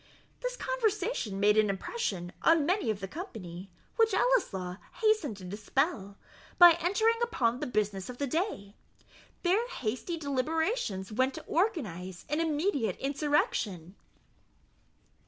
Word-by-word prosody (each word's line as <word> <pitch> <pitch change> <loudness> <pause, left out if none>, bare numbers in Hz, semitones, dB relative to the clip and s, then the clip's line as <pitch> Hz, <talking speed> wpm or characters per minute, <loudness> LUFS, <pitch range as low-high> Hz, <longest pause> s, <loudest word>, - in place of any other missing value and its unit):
This - - -3
conversation 435 - -1
made 210 +1 +5
an 215 -1 +3
impression 195 - -3
on 325 -3 +4
many 360 - +1
of 210 -2 -1
the 195 - -3
company, 195 - -8 0.3
which 450 -1 +4
Ellieslaw 190 - +1 0.2
hastened 430 - +1
to 190 - -11
dispel, 205 - -1 0.4
by 350 -1 +10
entering 445 +7 +2
upon 250 - +1
the - - -3
business 210 -4 -1
of 250 - -7
the 285 - -1
day. 275 - -2 0.7
Their 395 +7 +2
hasty 260 - -3
deliberations 285 - -1
went 260 +4 +1
to 315 - -7
organize 205 - -2
an 300 +3 0
immediate 295 - 0
insurrection. 270 - -1
270 Hz, 125 wpm, -30 LUFS, -, 0.7 s, by